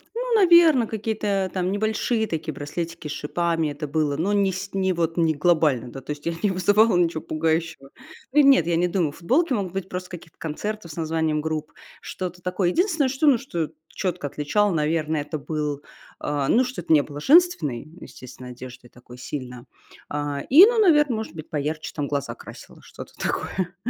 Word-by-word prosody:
Ну, - - -2
наверно, 340 - +6
какие-то 210 -3 -2
там 185 0 -1
небольшие 220 +2 0
такие 160 -2 -4
браслетики 165 +2 -5
с - - -5
шипами- 165 +1 -1
это 150 +1 -6
было, 145 -1 0
но 190 +6 0
не 200 -1 +2
сь 190 +2 -6
не 190 -1 +1
вот 165 -1 -1
не 165 -2 +3
глобально. 150 -6 +1
Да, 135 - -8
то 150 - -7
есть 145 0 -7
я 170 - -1
не 205 - +3
вызывала 205 +4 +3
ничего 170 -2 +1
пугающего. 160 -2 -2 0.4
Ы 300 - +5
у - - +7
нет, 270 - +5
я 170 - +1
не 175 +2 +2
думаю, 175 -4 0
футболки 265 - +1
могут 195 -6 -2
быть 195 0 -4
просто 180 0 -5
с - - -28
каких-то 170 -2 -11
концертов 170 +3 -5
с - - -10
названием 160 -2 -1
групп, 155 0 -4 0.3
что-то 180 -1 -6
такое. 180 0 0
Единственное, 330 - +1
что 275 +4 0
ну, 270 - +6
что 170 - -4 0.2
чётко 180 -5 -3
отличало 200 +9 0
наверное, 155 -1 0
это 155 +1 -5
был, 150 -1 -3 0.4
а, 145 -2 -2
ну, 250 +3 +4
что 255 -6 -5
это 160 - +1
не 150 - +6
было 145 0 -8
женственной, 270 - +3 0.2
естественно, 130 0 -11
одеждой 125 0 -11
такой 125 0 -15
сильно. 125 -2 -7 0.4
А, 145 -1 -3
и, 320 +9 +10
ну, 465 +1 +2
наверно, 295 - +4
может 220 -7 -5
быть, 155 -2 -9
поярче 155 +1 -3
там 145 -2 -2
глаза 140 -5 -3
красила, - - -13
что-то - - -12
такое. 185 -1 -3
170 Hz, 190 wpm, -23 LUFS, 150-205 Hz, 0.4 s, и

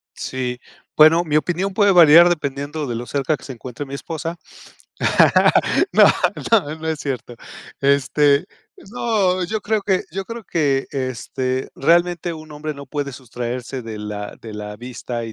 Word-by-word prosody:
Sí, 125 -1 -4 0.4
bueno, 160 +3 +6
mi 155 -2 +1
opinión 185 +4 -1
puede 205 0 +4
variar 170 -1 +8
dependiendo 145 -2 -3
de 120 - -3
lo 120 - -5
cerca 140 +3 -1
que - - -18
se 135 - -7
encuentre 125 +3 -8
mi 135 - -10
esposa, 165 +5 -5 1.6
no, - - +7 0.5
no, 165 -9 +3
no 160 0 -6
es 160 -1 -1
cierto. 125 -3 -5 0.5
Este 140 +1 +3 0.4
no, 200 -6 0
yo 215 +4 -3
creo 215 +1 -1
que 190 -2 +1
yo 195 +3 -4
creo 230 +2 -7
que, 140 -6 0
este, 130 0 -3
realmente 175 +3 +2
un 155 -1 -10
hombre 150 0 -5
no 140 -1 -10
puede 140 0 -4
sustraerse 125 +1 -6
de 110 -2 -7
la 105 -1 -6
de 110 - -9
la 105 0 -7
vista 120 0 -6
y 115 - -7
145 Hz, 160 wpm, -20 LUFS, 130-170 Hz, 1.6 s, variar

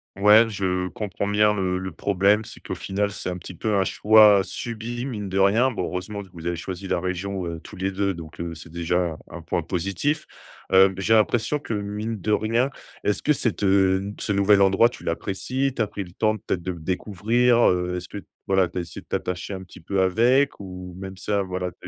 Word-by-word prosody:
Ouais, 105 +3 +6
je 90 -3 -1
comprends 100 -1 -4
bien 105 0 +3
le 90 -2 -1
le 95 0 -5
problème, 100 +4 +2
c'est - - -11
qu'au - - -6
final 100 +1 -1
c'est 100 - -5
un 90 - -4
petit 90 - -10
peu 105 +5 -1
un 95 - +3
choix 105 0 +6
subi, 120 +4 -5
mine 105 -6 -4
de 95 +1 -1
rien. 110 +7 +4
Bon, 90 - -3
heureusement 100 +3 -4
vous 85 -1 -10
avez 85 - -1
choisi 95 +2 -6
la - - 0
région, 95 +1 -3
heu, 85 -1 -5
tous - - -11
les 95 +1 -1
2 100 0 0
donc, 80 -3 -10
heu, 85 -1 -4
c'est 80 0 -11
déjà 85 +1 -1 0.3
un - - -7
un - - -9
point 85 0 -2
positif. 100 - -2 0.4
Hem 95 0 +6
j'ai 110 +4 +3
l'impression 115 +6 +2
que 140 - -5
mine 105 +1 -4
de 105 - -1
rien 115 +5 +2 0.3
est-ce 105 -1 0
que 150 - +4
cet, 115 -6 -1
heu, 95 -1 +3
n 100 +1 -5
ce 105 - -1
nouvel 100 0 +4
endroit 95 +4 +5
tu 120 - -10
l'apprécies, 125 +10 -2
tu 115 - -1
as 105 - +1
pris 100 0 -5
le 90 - -13
temps 110 +3 0
peut-être 95 -3 -3
de 90 +1 -3
le 85 - -10
découvrir? 110 +8 +2
Heu, 90 0 -1
est-ce 90 0 -7
que 100 - -7
t, - - -17 0.2
voilà, 95 -1 +3
tu 85 - -9
as - - +1
essayé 85 -1 -9
de - - -27
t'attacher 90 +2 -3
un 95 - -7
petit 90 - -14
peu 95 +3 -2
avec, 120 +9 +3
ou 90 -2 -8
même 95 -1 -7
ça 100 +1 -1
voilà, 90 -1 -3
tu 90 - -9
100 Hz, 230 wpm, -24 LUFS, 90-105 Hz, 0.4 s, Ouais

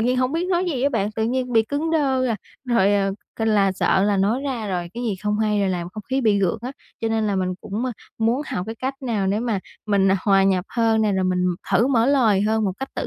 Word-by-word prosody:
nhiên 250 +3 +1
hông 255 +1 +1
biết 335 +3 -1
nói 360 -1 +1
gì 290 -9 -2
á 280 - +4
bạn, 215 -6 -1
tự 220 - -2
nhiên 250 +1 -1
bị 225 -1 +5
cứng 290 +7 -2
đơ 270 -5 +1
à, 230 -3 0 0.3
rồi, 230 -5 +3
ờ, 195 -1 +1 0.2
c - - -12
là 200 -3 +3
sợ 190 0 +2
là 205 -1 +2
nói 205 +6 +1
ra 245 -7 -3
rồi 175 -2 -2
cái 240 - -4
gì 225 -4 -1
không 210 0 0
hay 210 -1 +1
rồi 195 - +1
làm 175 -2 -2
không 215 +4 -8
khí 265 +5 -1
bị 215 -5 +3
gượng 190 +1 0
á. 255 - -5 0.3
Cho 225 - 0
nên 225 -1 0
là 200 -2 0
mình 185 -1 -1
cũng, 210 +5 -4
a, 255 - -2 0.3
muốn 230 +5 +1
học 180 - -3
cái 225 - -5
cách 260 +4 -3
nào 220 -6 -1
để 200 +3 0
mà 230 -4 -1 0.3
mình, 195 -2 +3
à, - - +3
hòa 195 -1 +4
nhập 190 -2 +2
hơn 225 -2 +2
nè, 210 -2 +2
rồi 190 -1 0
mình 180 0 +1 0.3
thử 235 - +4
mở 245 -3 +3
lời 235 -8 +3
hơn 220 +1 +1
một 195 - 0
cách 270 - -4
tự - - -3
220 Hz, 280 wpm, -22 LUFS, 195-250 Hz, 0.3 s, bị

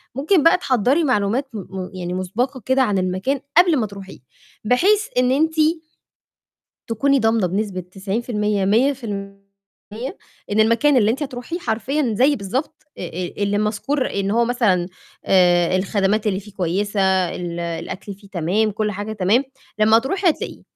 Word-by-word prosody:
ممكن 300 +5 +2
بقى 335 +2 +6
تحضّري 265 - +1
معلومات 250 0 +1
م 215 - -5
م 190 -1 -7
يعني 180 -1 -5
مُسبَقة 240 +9 -2
كده 260 +1 +2
عن 205 -6 0
المكان 185 +9 -1 0.2
قبل 350 -3 +6
ما 235 - 0
تروحيه، 195 -1 -11 0.4
بحيث 390 - +3
إن 250 0 +3
أنتِ 315 +4 +2 1.4
تكوني 275 +5 +2
ضامنة 225 -4 +2
بنسبة 195 0 -2
90%، 205 +2 -2
100% 205 -3 -1 1.1
إن 215 - +3
المكان 235 +6 +3
اللي 215 -3 +4
أنتِ 260 +6 -2
هتروحيه 265 +4 -5
حرفيًا 260 -2 -1
زي 275 +6 +4
بالضبط 245 +10 -4 0.2
أ - - -7
أ 180 +3 -4
اللي 205 0 +1
مَذكور 220 +7 -1
إن 200 0 -2
هو 235 +2 +3
مثلًا 210 -8 +1 0.4
آآ، 175 -1 +4
الخدمات 200 +2 0
اللي 190 -1 -1
فيه 210 +1 -14
كويسة، 195 +3 -1 0.4
ال 175 -1 -5
الأكل 170 +4 -5
فيه 200 +1 -18
تمام، 195 +4 0
كل 215 +1 -1
حاجة 205 +2 -5
تمام، 210 +6 +2 0.4
لمّا 220 +1 +6
هتروحي 350 - 0
هتلاقيه. - - -6
215 Hz, 150 wpm, -21 LUFS, 195-260 Hz, 1.4 s, بقى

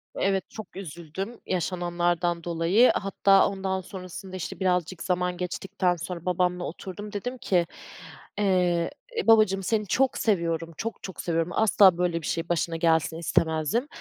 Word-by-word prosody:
Evet, 195 -1 0
çok 220 -3 -10
üzüldüm 190 +5 -6
yaşananlardan 175 -1 -1
dolayı, 175 +8 +4
hatta 195 0 +4
ondan 190 -1 -2
sonrasında, 185 0 -8
işte, 185 - -5
birazcık 180 -2 0
zaman 180 -1 0
geçtikten 180 0 -1
sonra 175 +1 -6
babamla 180 0 0
oturdum, 195 +5 -7
dedim 245 +5 -4
ki, 180 -7 +1 0.7
eee, 180 -4 +2 0.3
e, - - -1
babacığım 215 -4 +5
seni 210 +1 0
çok 265 +5 +2
seviyorum, 170 -5 0
çok 225 0 -5
çok 190 - -6
seviyorum, 165 0 -1
asla 200 -4 +5
böyle 175 -2 0
bir - - -5
şey 165 0 -2
başına 170 -1 0
gelsin 160 -1 +2
istemezdim 160 - +1
180 Hz, 140 wpm, -26 LUFS, 170-195 Hz, 0.7 s, babacığım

